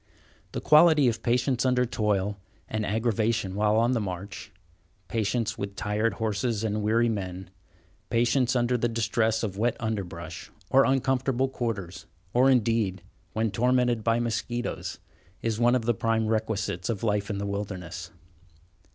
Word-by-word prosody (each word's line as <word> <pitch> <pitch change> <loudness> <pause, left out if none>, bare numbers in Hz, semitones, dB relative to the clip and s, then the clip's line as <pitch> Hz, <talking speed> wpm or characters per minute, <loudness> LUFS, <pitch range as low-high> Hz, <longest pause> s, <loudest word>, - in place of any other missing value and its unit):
The - - -3
quality 155 -2 +6
of 115 - -4
patience 125 +1 +1
under 125 -1 +3
toil 105 -4 -1 0.3
and 110 0 -2
aggravation 110 -2 0
while 105 +1 +2
on 115 +2 +3
the 120 -3 +1
march—patience 95 +3 -5
with 100 0 -4
tired 105 +3 0
horses 110 0 -1
and 105 -1 -1
weary 115 +3 +2
men—patience 105 +6 -2
under 120 0 +2
the 120 - +2
distress 110 0 0
of 100 -2 -3
wet 120 +1 +1
underbrush, 110 -6 -5 0.2
or 135 +1 +6
uncomfortable 130 0 +1
quarters, 110 -9 -4 0.3
or, 130 +2 +5
indeed, 115 -7 +1 0.3
when 110 -1 0
tormented 125 0 +2
by 115 +1 +2
mosquitoes, 120 +1 -3 0.5
is 115 -1 -1
one 120 +1 +4
of 120 -3 -1
the 120 - +3
prime 115 +1 0
requisites 110 -4 -1
of 110 -3 -2
life 105 -2 0
in 105 - -2
the 100 - -3
wilderness. 95 -4 -5
110 Hz, 140 wpm, -27 LUFS, 100-120 Hz, 0.5 s, quality